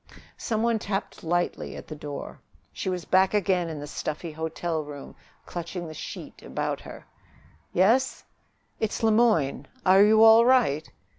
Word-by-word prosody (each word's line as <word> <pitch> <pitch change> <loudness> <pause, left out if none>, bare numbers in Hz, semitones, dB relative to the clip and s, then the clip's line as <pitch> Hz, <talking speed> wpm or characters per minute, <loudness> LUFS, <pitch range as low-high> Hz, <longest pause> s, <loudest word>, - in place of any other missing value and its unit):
Some 220 -1 -2
one 230 -1 +2
tapped 200 -1 -4
lightly 175 +2 -1
at - - -9
the 155 - -7
door. 145 -1 -7 0.3
She - - -3
was 180 -2 -3
back 190 +2 +3
again 185 -4 +1
in 155 -2 -6
the 145 - -6
stuffy 155 +2 -5
hotel 160 +1 -3
room, 145 -1 -10 0.3
clutching 175 0 -6
the 155 - -8
sheet - - -8
about - - -3
her. - - -11 0.7
"Yes?" 230 +9 +2 0.6
"It's 220 +1 -2
Le 220 - +4
Moyne. 215 - +2 0.2
Are 190 +2 +7
you 220 +1 +6
all 225 +1 +8
right?" 235 - +3
185 Hz, 155 wpm, -26 LUFS, 160-220 Hz, 0.7 s, all